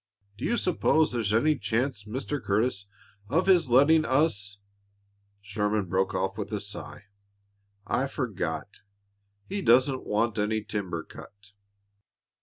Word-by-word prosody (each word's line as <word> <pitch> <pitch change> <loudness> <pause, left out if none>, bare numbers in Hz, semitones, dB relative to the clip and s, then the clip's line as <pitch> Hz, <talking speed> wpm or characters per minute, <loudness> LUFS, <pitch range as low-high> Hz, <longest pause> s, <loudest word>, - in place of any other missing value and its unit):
Do - - -5
you 240 - +1
s'pose 160 -4 +2
there's 115 -4 -1
any 145 +7 +2
chance, 110 +1 -1
Mr. 130 +5 -4
Curtis, 100 0 0 0.4
of 165 +8 +2
his 175 -7 +4
letting 145 +6 +5
us 110 -9 +1 0.4
" 100 0 -42
Sherman 105 0 -1
broke 95 +2 0
off 95 0 -2
with - - -4
a - - -2
sigh. - - -6 0.8
"I 135 - 0
forgot. 100 - -4 0.7
He 200 +1 -3
doesn't 130 -1 +3
want 110 +1 0
any 105 +1 0
timber 95 -6 -4
cut." 100 0 -14
110 Hz, 130 wpm, -27 LUFS, 100-135 Hz, 0.8 s, letting